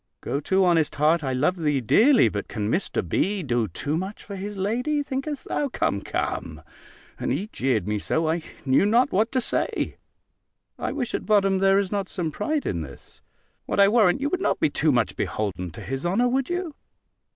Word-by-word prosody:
Go 140 - -2
to, 190 +5 +2
honest 165 -4 +2
heart, 155 +2 +3
I 135 - -1
love 150 +8 +1
thee 150 -4 +1
dearly; 220 - +5
but 100 -1 -3
can 105 +1 -3
Mr. 185 - -1
B. 200 -1 0
do 120 -5 0
too 140 - -3
much 190 +5 -4
for 200 - -8
his 200 +1 -6
lady, 250 +10 0
think'st 275 +1 -4
thou? 290 - -1
Come, - - -1
come" - - -4 0.6
(and - - -1
he 210 - -2
jeered 125 -8 0
me 105 0 -1
so, 160 +9 0
I 165 +2 0 0.2
knew 130 +5 +4
not 235 +4 +3
what 220 +4 +1
to 260 - +2
say), 245 - -1 0.8
"I - - -2
wish 260 -5 -3
at - - -3
bottom 195 -3 +3
there 195 0 +4
is 200 -2 0
not 200 -2 -2
some 170 -5 -3
pride 305 - -2
in 85 -4 -2
this. 70 -3 -11 0.5
What, - - -1
I 200 0 +7
warrant, 215 +1 +3
you 285 - 0
would 370 +4 -1
not - - +1
be 145 - +2
too 155 +1 +2
much 120 -4 +1
beholden 95 -4 -3
to 80 - -10
his 135 +1 -4
honour, 195 +8 +2
would 260 +1 0
you?" 350 -3 -3
190 Hz, 205 wpm, -24 LUFS, 140-235 Hz, 0.8 s, I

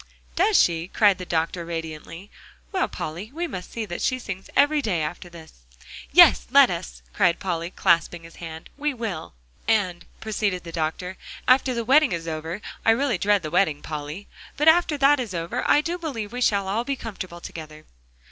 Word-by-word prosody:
"Does 395 +4 +3
she?" 165 0 +2
cried 205 -1 +3
the 180 - -7
doctor 170 +1 -1
radiantly. 165 +2 -7 0.4
"Well, 375 -2 +1
Polly, 175 +8 -6
we 345 +2 -2
must 185 - -7
see 230 -2 -4
that 175 -4 -6
she 255 - +1
sings 195 -6 -7
every 290 +1 +4
day, 180 - -1
after 175 +3 -5
this." 160 - -14 0.5
"Yes, - - +7
let - - +6
us," - - -6
cried 170 - +3
Polly, 170 -2 -3
clasping 170 -1 +1
his 165 0 -14
hand; 160 -1 -9
"we 295 -1 -1
will." 195 - -5 0.3
"And," 185 -6 +1
proceeded 205 -4 -2
the 170 - -8
doctor, 165 +3 -3 0.3
"after 255 0 +4
the 235 -1 -2
wedding 275 - +5
is 165 -1 -4
over 160 +4 -4 0.2
I 225 - +5
It - - +1
really 255 -6 0
dread 205 -1 +2
the 155 - -5
wedding, 165 -5 +1
Polly 150 +5 -6 0.3
but 300 - +1
after 320 -2 +5
that 280 +1 +4
is 225 -7 -4
over, 165 0 -3
I 295 - +5
do 345 +3 -3
believe 235 -10 -5
we 250 - -4
shall 200 -5 +2
all 215 +5 0
be 275 +2 -2
comfortable 190 -8 -7
together!" 155 -2 -10
185 Hz, 190 wpm, -24 LUFS, 165-240 Hz, 0.5 s, Yes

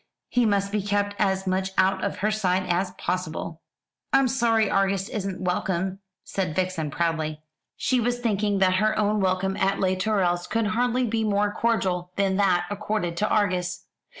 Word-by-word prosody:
He 245 -2 +2
must 200 -1 +1
be 210 0 0
kept 205 0 -1
as 190 -1 +1
much 190 0 -1
out 190 +1 +2
of 200 -1 -2
her 215 - +2
sight 190 -3 +1
as 180 +2 +1
possible." 170 -2 -3 0.5
"I'm 270 -1 +4
sorry 230 -4 +2
Argus 195 0 +1
isn't 195 -3 -4
welcome," 185 +1 -1 0.2
said 180 -6 -3
Vixen 185 -4 -1
proudly. 155 -1 -2 0.3
She 255 - +1
was 245 +1 0
thinking 210 -4 0
that 185 -1 +3
her 215 +2 +1
own 210 0 +2
welcome 190 0 0
at 195 +1 +1
Les 185 -1 +2
Tourelles 185 -3 0
could 230 -1 0
hardly 245 +3 +1
be 225 -1 0
more 205 -1 +1
cordial 185 -7 0
than 195 -1 +1
that 185 -3 +3
accorded 205 -4 -2
to 210 +4 +1
Argus. 180 -3 0
195 Hz, 170 wpm, -25 LUFS, 185-215 Hz, 0.5 s, I'm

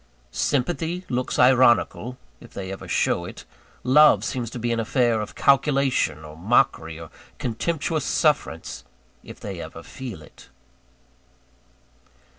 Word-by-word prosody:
Sympathy 165 - -1
looks 125 0 -2
ironical, 125 -1 +4 0.2
if - - -16
they 95 -1 -5
ever 95 - -8
show - - +1
it: - - -10 0.4
love 150 +4 +6
seems 120 -4 -3
to 120 - -7
be 120 0 -1
an 115 - 0
affair 115 0 +1
of 105 - -7
calculation, 135 - +2
or 75 0 -11
mockery, 80 -4 +1
or 80 -1 -10 0.3
contemptuous 155 +5 -2
sufferance, 140 - 0 0.4
if - - -11
they - - -6
ever - - -9
feel 115 -12 -8
it. 70 - -17
125 Hz, 125 wpm, -24 LUFS, 100-140 Hz, 0.4 s, love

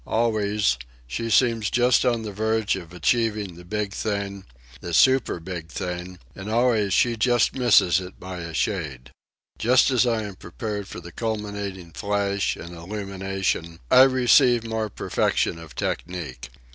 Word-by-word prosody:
Always, 105 - +1 0.3
she 65 - -4
seems 115 -2 +3
just 125 +1 +3
on 120 -2 +1
the 105 - -5
verge 110 +1 0
of 85 -4 -8
achieving 105 +2 0
the 85 +1 -13
big 105 +2 -3
thing, 100 -3 -3 0.3
the 85 -1 -3
super 130 -6 +4
big 85 -1 -6
thing, 90 +2 -5 0.2
and 95 +2 -8
always 115 -3 +2
she 120 +5 +3
just 120 +1 +2
misses 110 - +4
it 90 0 -10
by 90 -1 -7
a 85 -1 -6
shade. 80 - -3 0.5
Just 125 +3 +4
as 125 -1 +3
I 115 -2 +1
am 100 -2 -7
prepared 105 -3 -5
for - - -8
the 85 +1 -10
culminating 100 -5 -4
flash 100 +2 -1
and 85 +1 -9
illumination, 95 -2 -3
I 130 - +8
receive 125 -1 +4
more 110 -1 -2
perfection 85 - 0
of 80 -5 -12
technique. 80 -9 -4
100 Hz, 150 wpm, -24 LUFS, 90-115 Hz, 0.5 s, I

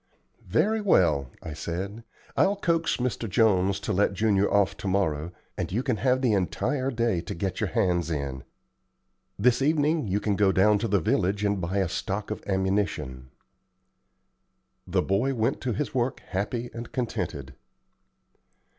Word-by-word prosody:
"Very 220 +1 +2
well," 80 - +3
I 80 - -6
said, 95 +8 -5 0.3
"I'll 200 - +3
coax 170 -4 +1
Mr. 120 -3 -2
Jones 100 -1 +3
to - - -2
let 100 +1 +2
Junior 100 -1 +2
off 100 -1 +3
to - - -5
morrow, 85 -4 0 0.3
and - - -2
you 115 +7 0
can 125 -5 0
have 130 +2 +2
the 120 -4 +3
entire 130 +8 0
day 115 -8 0
to 85 - -6
get 95 +2 -3
your - - 0
hands 90 -7 +1
in. 70 -4 -3 0.9
This 120 +5 +3
evening 150 -1 +2
you 100 +2 +1
can 105 -1 0
go 100 -1 +4
down 105 +2 +4
to 115 - -1
the 100 -2 +2
village 100 +4 +1
and 100 -2 0
buy 90 +3 -2
a 95 -2 +2
stock 100 +4 -3
of 110 - -4
ammunition." 95 -10 -1 1.6
The 90 0 +1
boy 120 +8 +1
went 115 +3 0
to 125 -2 -1
his 140 +8 -3
work 125 0 -1
happy 115 +5 -2
and 115 0 -7
contented. 70 - -3
100 Hz, 160 wpm, -27 LUFS, 95-120 Hz, 1.6 s, go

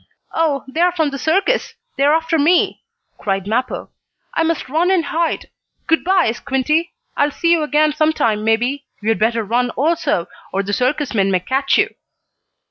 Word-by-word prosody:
"Oh, 305 -4 0
they're 335 +7 +2
from 320 -4 0
the 275 - -5
circus! 385 - +1 0.2
They're 285 +2 +3
after 325 0 0
me!" 335 +5 +2 0.4
cried 195 -2 -2
Mappo. 240 +5 -2 0.4
"I - - 0
must 325 -3 -1
run 320 +7 +1
and 365 -4 +2
hide. 330 +3 -2 0.3
Good 325 - +2
by, 370 -9 +3
Squinty. 295 - -1 0.2
I'll 285 - +2
see 335 +3 0
you 335 -2 +4
again 300 0 +2
sometime, 300 -9 +1
maybe. 245 +6 0 0.2
You 215 - 0
had 225 - +1
better 225 +1 +1
run, 240 +4 0
also, 305 - +1 0.3
or 195 +1 -1
the 205 +1 -4
circus 265 +5 0
men 195 -3 +2
may 185 -1 +2
catch 270 +7 +1
you." - - +1
285 Hz, 170 wpm, -18 LUFS, 235-325 Hz, 0.4 s, you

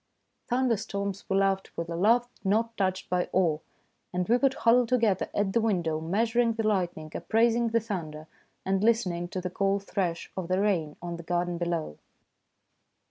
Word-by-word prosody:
Thunderstorms 215 -5 -1
we 195 - +2
loved 195 -1 +1
with 170 - -3
a 170 - -4
love 230 +7 +3 0.2
not 220 +4 +1
untouched 190 -4 -1
by 180 -1 0
awe, 165 -5 +2 0.5
and 180 0 -1
we 235 +3 +4
would 270 +1 +2
huddle 240 +1 +4
together 225 -5 +1
,at 200 -1 0
the 230 - +3
window, 175 -8 0
measuring 230 +7 +1
the 225 -1 -1
lightning, 175 -6 -1
appraising 230 +1 +2
the 230 0 +2
thunder, 165 -9 -5 0.4
and 195 +1 +1
listen 225 -4 +3
ing 175 0 -4
to 185 - -4
the 180 0 -4
cool 195 +1 +1
thresh 185 -4 -3
of 185 -3 -4
the 185 +1 +1
rain 175 -8 0
on 170 -1 -4
the - - -7
garden 175 0 -1
below. 170 - -2
195 Hz, 175 wpm, -28 LUFS, 175-225 Hz, 0.5 s, we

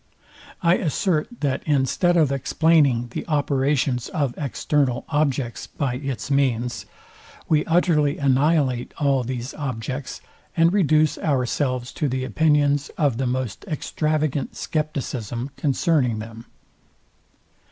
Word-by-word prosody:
I 170 +1 +4
assert, 155 0 0
that 140 -3 0
instead 150 +5 +2
of 155 -4 +3
explaining 140 -3 +2
the - - -4
operations 140 -4 0
of 140 -7 -1
external 135 -1 -1
objects 135 -7 -1
by 130 -4 -2
its 135 0 -4
means, 125 -4 0 0.6
we 155 -1 +3
utterly 160 -4 +2
annihilate 135 -2 +1
all 140 -4 +2
these 125 +1 -5
objects, 130 -1 -5 0.4
and 165 +2 +4
reduce 155 -6 +3
ourselves 130 -2 -1
to 150 - -2
the 130 0 -2
opinions 145 +2 +2
of 140 -7 +1
the 130 0 -1
most 125 -4 -3
extravagant 155 -2 -1
scepticism 135 -5 -3
concerning 140 -5 +1
them. 115 +1 -9
140 Hz, 110 wpm, -23 LUFS, 125-155 Hz, 0.6 s, I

